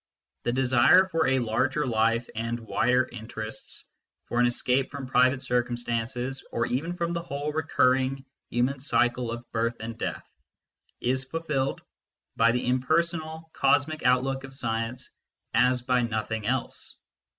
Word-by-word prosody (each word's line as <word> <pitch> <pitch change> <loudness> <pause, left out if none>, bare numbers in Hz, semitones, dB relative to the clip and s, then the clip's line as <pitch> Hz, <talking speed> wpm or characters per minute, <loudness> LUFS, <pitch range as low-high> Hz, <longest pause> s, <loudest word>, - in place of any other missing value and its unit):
The 120 - +2
desire 130 +8 +5
for 165 -5 +1
a 130 0 +3
larger 130 +5 +1
life 115 0 +1
and 115 +2 -2
wider 125 +3 +2
interests, 110 -2 -7 0.4
for 120 - -1
an 120 - +5
escape 125 +2 +1
from 140 -2 -6
private 130 +1 +3
circumstances, 120 +1 -1
and 115 0 -1
even 160 +8 -1
from 170 -1 -1
the 170 - -2
whole 145 -2 -3
recurring 130 -3 +2 0.2
human 125 +3 0
cycle 125 -3 +1
of 120 +1 -6
birth 115 +1 0
and 115 +1 -5
death, - - -4 0.7
is 130 +2 0
fulfilled 140 -3 -2 0.5
by 115 0 +5
the 125 +1 -1
impersonal 160 +5 0
cosmic 145 +3 +2
outlook 130 +2 +2
of 135 0 -10
science 115 0 -3 0.4
as 125 -1 +3
by 125 0 +2
nothing 110 -2 -2
else. 130 -1 -2
125 Hz, 140 wpm, -27 LUFS, 120-135 Hz, 0.7 s, desire